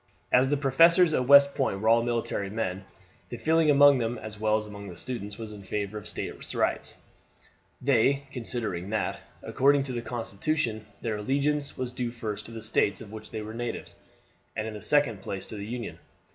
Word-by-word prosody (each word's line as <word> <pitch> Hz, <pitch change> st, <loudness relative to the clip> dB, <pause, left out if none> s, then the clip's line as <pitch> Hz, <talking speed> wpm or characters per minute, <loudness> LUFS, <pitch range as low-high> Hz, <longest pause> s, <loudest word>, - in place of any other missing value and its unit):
As 130 Hz, +1 st, +5 dB
the 145 Hz, -, +2 dB
professors 165 Hz, +5 st, +5 dB
at 125 Hz, -3 st, +1 dB
West 140 Hz, 0 st, +8 dB
Point 130 Hz, -8 st, 0 dB
were 110 Hz, -, -2 dB
all 115 Hz, +1 st, +6 dB
military 115 Hz, -4 st, -2 dB
men, 95 Hz, -3 st, -3 dB, 0.4 s
the 120 Hz, -, -5 dB
feeling 160 Hz, +5 st, +3 dB
among 145 Hz, -1 st, +7 dB
them, 120 Hz, +1 st, -1 dB
as 110 Hz, -1 st, -8 dB
well 110 Hz, 0 st, +2 dB
as 110 Hz, -, -4 dB
among 105 Hz, -1 st, -9 dB
the 90 Hz, -3 st, -9 dB
students, 105 Hz, -3 st, -6 dB
was 110 Hz, -2 st, -7 dB
in 105 Hz, -1 st, -9 dB
favor 100 Hz, +1 st, -3 dB
of 105 Hz, -, -6 dB
State -, -, -5 dB
rights; -, -, -1 dB, 0.8 s
they 135 Hz, +1 st, +3 dB
considering 115 Hz, -7 st, -4 dB
that, 110 Hz, -1 st, -1 dB, 0.2 s
according 140 Hz, +1 st, +3 dB
to 135 Hz, -2 st, -5 dB
the 120 Hz, -, -2 dB
constitution, 115 Hz, 0 st, -2 dB
their 110 Hz, -2 st, -2 dB
allegiance 140 Hz, +6 st, -1 dB
was 130 Hz, -1 st, -3 dB
due 125 Hz, -1 st, -3 dB
first 115 Hz, -3 st, -5 dB
to -, -, -11 dB
the 115 Hz, -1 st, -8 dB
States 110 Hz, -2 st, +1 dB
of 110 Hz, -3 st, -10 dB
which 110 Hz, 0 st, -8 dB
they 110 Hz, -, -5 dB
were 110 Hz, +1 st, -7 dB
natives, 120 Hz, +1 st, -5 dB, 0.6 s
and 110 Hz, -, -2 dB
in 110 Hz, -, -5 dB
the 105 Hz, -, -8 dB
second 145 Hz, -9 st, +2 dB
place 95 Hz, 0 st, -5 dB
to -, -, -9 dB
the 100 Hz, 0 st, -6 dB
Union. 120 Hz, +1 st, -5 dB
115 Hz, 200 wpm, -28 LUFS, 105-135 Hz, 0.8 s, West